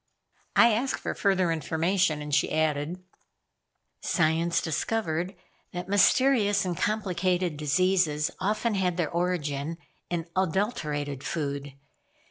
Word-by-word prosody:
I 235 -1 +6
asked 250 +5 -1
for - - -2
further 190 -4 +2
information 165 0 0
and 150 0 -6
she - - +2
added: 155 +3 -1 1.0
"Science 165 0 +1
discovered 175 +1 -2 0.4
that 180 0 -5
mysterious 205 0 +4
and 180 -1 -2
complicated 185 -3 0
diseases 155 +1 +1
often 215 +4 0
had 180 -3 0
their 165 -4 -1
origin 165 -3 -1 0.3
in 170 -2 -2
adulterated 155 - -1
food. 140 -3 -3
175 Hz, 105 wpm, -27 LUFS, 155-190 Hz, 1.0 s, I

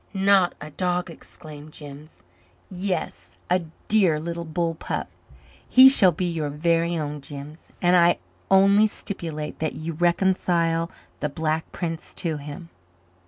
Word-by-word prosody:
"Not 195 -2 +3
a 150 +1 -9
dog?" 180 +1 -1
exclaimed 155 -2 -12
Jims. 145 +1 -11 0.5
"Yes 185 0 -4
a 180 - +4 0.3
dear 190 -8 +3
little 170 +1 -5
bull 165 +1 -1
pup. 160 - -4 0.6
He 260 +1 +9
shall 195 -9 +6
be 175 +3 -3
your 165 -4 -2
very 165 +3 +1
own, 150 -1 -4
Jims, 145 +3 -9
and 175 +1 +5
I 175 -1 +5 0.3
only 195 +2 +5
stipulate 165 -8 -6
that 155 -1 -2
you 160 +2 -5
reconcile 170 -1 +1 0.3
the 150 - -1
Black 160 +2 -2
Prince 165 -2 -5
to 160 -3 -2
him." 150 +4 -9
165 Hz, 135 wpm, -24 LUFS, 155-180 Hz, 0.6 s, He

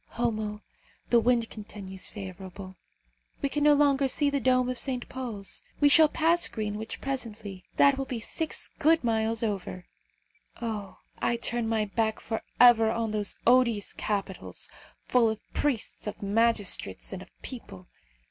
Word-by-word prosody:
Homo, 215 -3 -2 0.5
the 240 - +7
wind 235 0 +2
continues 200 -3 -7
favourable. 190 -1 -8 0.7
We 280 - +2
can 295 +1 -1
no 295 0 +6
longer 280 -1 +3
see 285 +2 +2
the 280 - +1
dome 255 0 +3
of 255 -1 -3
St. 255 -3 -2
Paul's. 235 -7 -6 0.2
We 290 - +6
shall 315 +2 +7
pass 335 +2 +3
Greenwich 215 0 -4
presently. 215 -8 -5
That 280 -1 +5
will 270 - -1
be 250 -3 -4
six 315 +7 -2
good 320 0 +4
miles 225 -1 +1
over. 195 -4 -3 0.7
Oh! 215 -4 -5 0.2
I 235 - +1
turn 235 0 0
my 220 -1 +1
back 220 +1 -1
for 225 -1 -4 0.2
ever 235 -2 +7
on 225 -1 -1
those 210 -2 -1
odious 235 -4 +3
capitals, 195 -3 -3 0.4
full 240 -3 +4
of 220 -1 -3
priests, 260 -7 -1
of 210 - -6
magistrates, 215 -1 +1
and - - -6
of - - -12
people. 225 -8 -7
230 Hz, 150 wpm, -28 LUFS, 210-255 Hz, 0.7 s, the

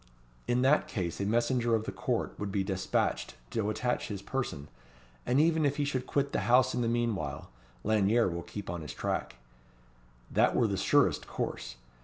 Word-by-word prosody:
In 125 +1 +2
that 140 +3 +4
case 90 -3 -3
a 100 - 0
messenger 120 +1 +2
of 110 - -1
the - - -4
Court - - -2
would 105 -1 -3
be 95 0 0
despatched 95 -1 -1 0.2
to 110 -2 0
attach 125 +3 -1
his 100 -2 -5
person; 120 - -3 0.6
and 125 +3 +3
even 160 0 +3
if 145 -1 +1
he 145 - +1
should 130 -3 -2
quit 140 0 0
the - - +1
house 130 +1 +5
in 125 - 0
the 115 - +1
meanwhile, 115 -12 -2 0.3
Lanyere 110 +2 +3
will 85 -1 -3
keep 100 +3 -8
on 85 -1 -4
his 75 - -7
track. - - -2 1.0
That - - +3
were - - +4
the - - 0
surest - - +2
course. - - -4
115 Hz, 185 wpm, -30 LUFS, 95-130 Hz, 1.0 s, house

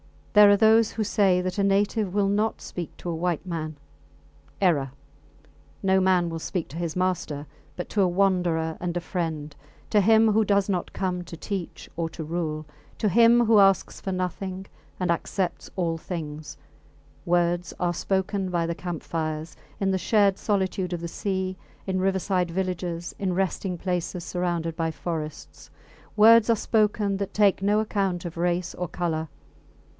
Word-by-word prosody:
There 210 -1 +8
are 205 - +6
those 220 +1 +5
who 220 - -1
say 195 -3 +3
that 185 +2 -3
a - - +3
native 200 0 +1
will 200 -1 +2
not 210 +2 0
speak 175 -3 -6
to 175 - -6
a 170 - -2
white 175 +1 -1
man. 160 -3 -4 0.9
Error. 145 -8 +2 0.9
No 190 0 +4
man 185 -2 +3
will 165 0 -4
speak 170 +1 -3
to 150 - -8
his 170 -2 -3
master; 180 -5 -1 0.3
but 175 - -5
to 205 - +1
a 190 - +4
wanderer 175 -4 +1
and 175 -1 -3
a - - -2
friend, 160 -5 -4 0.4
to 210 - +5
him 220 +2 +5
who 220 +1 +3
does 200 -1 +2
not 180 -3 -2
come 180 -2 -2
to 170 - -8
teach 190 -1 -5
or 165 -1 -1
to 160 - -6
rule, 155 -1 -3 0.3
to 210 - +1
him 235 +4 +5
who 220 -1 +5
asks 195 -1 +3
for 190 - -3
nothing 185 +1 -3 0.3
and 180 -2 +1
accepts 175 +2 -2
all 170 -3 0
things, 150 -4 -6 0.7
words 175 0 +1
are 175 -1 +1
spoken 190 +2 -1
by 170 -2 0
the 170 - -1
camp 175 -1 -5
fires, 155 -1 -3 0.3
in 195 -1 +2
the 190 - 0
shared 200 +1 +3
solitude 190 -3 -1
of 170 - -3
the 170 - -4
sea, 190 0 -2 0.3
in 190 -1 -1
riverside 190 -1 0
villages, 175 -1 -3
in 190 -2 0
resting 190 0 -1
places 180 0 -3
surrounded 175 -2 -2
by 165 -1 -1
forests 160 -2 -6 0.5
words 225 +1 +7
are 230 - +5
spoken 210 -2 +1
that 200 -1 -4
take 205 -3 +4
no 205 +2 +3
account 195 -4 -1
of 170 -1 -6
race 175 +1 0
or 180 - -3
colour. 160 -1 -2
180 Hz, 170 wpm, -25 LUFS, 170-195 Hz, 0.9 s, There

